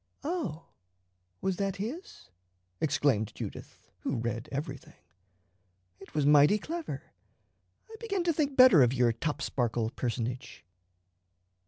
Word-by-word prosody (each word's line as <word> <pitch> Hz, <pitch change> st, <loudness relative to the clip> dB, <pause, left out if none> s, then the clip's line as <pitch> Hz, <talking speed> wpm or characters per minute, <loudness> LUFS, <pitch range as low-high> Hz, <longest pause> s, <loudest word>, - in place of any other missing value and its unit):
"Oh, 280 Hz, -, -3 dB, 0.8 s
was 190 Hz, -2 st, -1 dB
that 195 Hz, -1 st, -1 dB
his?" 235 Hz, -, -7 dB, 0.5 s
exclaimed 140 Hz, -8 st, +1 dB
Judith, -, -, -9 dB
who -, -, -2 dB
read 115 Hz, 0 st, -3 dB
everything. 140 Hz, -1 st, -6 dB, 1.0 s
"It -, -, -15 dB
was 150 Hz, -2 st, +2 dB
mighty 150 Hz, +7 st, +6 dB
clever. 325 Hz, -, -5 dB, 0.8 s
I 445 Hz, -, -11 dB
begin 400 Hz, -6 st, -2 dB
to 340 Hz, -1 st, +2 dB
think 290 Hz, -3 st, -1 dB
better 255 Hz, -, +8 dB
of 125 Hz, 0 st, +4 dB
your 120 Hz, -2 st, +3 dB
Topsparkle 120 Hz, -4 st, -1 dB
personage." 120 Hz, -1 st, -4 dB
150 Hz, 115 wpm, -30 LUFS, -, 1.0 s, better